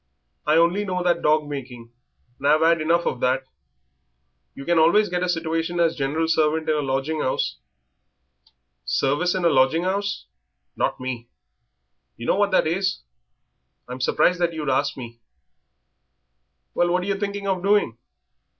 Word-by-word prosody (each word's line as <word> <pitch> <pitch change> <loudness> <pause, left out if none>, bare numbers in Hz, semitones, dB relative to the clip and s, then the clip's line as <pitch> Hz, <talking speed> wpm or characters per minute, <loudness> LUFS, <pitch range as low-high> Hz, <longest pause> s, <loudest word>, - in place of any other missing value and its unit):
"I 155 - +4
only 170 +5 +3
know 180 -2 -2
that 175 -1 +1
dog 150 0 +2
making, 125 -5 -8 0.5
and 140 - -1
I've 155 +2 +4
'ad 165 0 +3
enough 170 +2 +1
of 125 - -2
that." 130 +1 +1 1.1
"You 140 - -9
can 170 -1 +2
always 205 +7 +4
get 180 0 -2
a 180 - -1
situation 165 0 -2
as 165 -1 +2
general 150 +4 -1
servant 160 0 +1
in 155 - +2
a - - 0
lodging 135 +3 -2
'ouse." 70 - -2 1.2
"Service 160 +7 0
in 185 -2 -1
a - - +6
lodging 145 +4 +3
'ouse! 200 +1 -2 0.5
Not - - -1
me. 125 -2 -6 0.9
You 115 - -7
know - - +2
what 205 0 +2
that 190 - +2
is. 190 +4 -1 0.8
I'm 125 +1 -7
surprised 180 +7 +2
that 170 -1 0
you'd 150 -4 -2
ask 130 - 0
me." 115 -2 -9 1.5
"Well, 175 - +1
what 180 +1 +1
are - - -5
yer 200 0 -2
thinking 200 -1 -3
of 190 -2 0
doing?" 200 - +1
160 Hz, 160 wpm, -23 LUFS, 135-180 Hz, 1.5 s, a